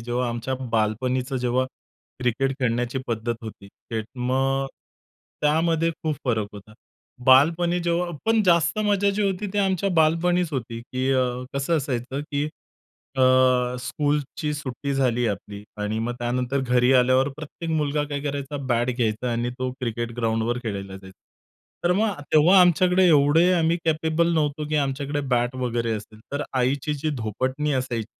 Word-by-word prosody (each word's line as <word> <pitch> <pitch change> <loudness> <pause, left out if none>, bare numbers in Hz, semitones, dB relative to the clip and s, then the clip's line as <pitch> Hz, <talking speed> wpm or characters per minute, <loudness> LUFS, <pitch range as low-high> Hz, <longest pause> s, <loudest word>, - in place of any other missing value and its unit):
जेव्हा 120 +1 -1
आमच्या 120 +2 -3 0.2
बालपणीचं, 125 +4 0
जेव्हा 125 +1 +1 0.5
क्रिकेट 125 +2 0
खेळण्याची 125 +1 0
पद्धत 115 +1 -2
होती, 110 -3 -9
त्यात 110 +2 -6
मग 135 +2 +1 0.7
त्यामध्ये 165 +2 +2
खूप 155 -2 -1
फरक 110 -5 0
होता. 105 +1 -12 0.5
बालपणी 165 +7 +5
जेव्हा 170 +1 0 0.2
पण 225 -1 +4
जास्त 170 0 +3
मजा 200 -1 +2
जी 210 - +1
होती 195 0 -1
ती 205 - -1
आमच्या 195 -1 +1
बालपणीच 170 +2 +3
होती, 115 -3 -4
की 130 +2 -2
अ, 130 -1 +3 0.3
कसं 140 +4 +1
असायचं, 130 -1 -3
की 145 0 0 0.7
अ, - - 0 0.6
स्कूलची 145 +3 -2
सुट्टी 140 -1 -4
झाली 125 -3 +1
आपली 100 0 -5 0.2
आणि 105 +1 -2
मग 120 +2 -2
त्यानंतर 125 +3 -1
घरी 125 0 +3
आल्यावर 130 +1 +4
प्रत्येक 155 +2 -7
मुलगा 150 -1 0
काय 145 -1 -3
करायचा, 145 0 -3
बॅट 120 0 +1
घ्यायचा 120 0 0
आणि 120 +1 -1
तो 130 0 -1
क्रिकेट 120 -1 -3
ग्राउंडवर 115 +1 0
खेळायला 100 -4 -5
जायचा. 95 0 -14 0.7
तर 175 - +4
मग 215 0 +1 0.2
तेव्हा 170 +5 +7
आमच्याकडे 180 +1 +4
एवढे 160 +3 +5
आम्ही 165 -1 +2
कॅपेबल 160 +1 +1
नव्हतो, 150 -1 0
की 155 - 0
आमच्याकडे 140 +1 -1
बॅट 125 0 +1
वगैरे 120 -2 -1
असेल, 110 +1 -11
तर 140 +1 -1
आईची 130 +4 0
जी 150 +2 -2
धोपटणी 130 +6 -2
असायची. 125 -4 -2
135 Hz, 150 wpm, -24 LUFS, 120-155 Hz, 0.7 s, तेव्हा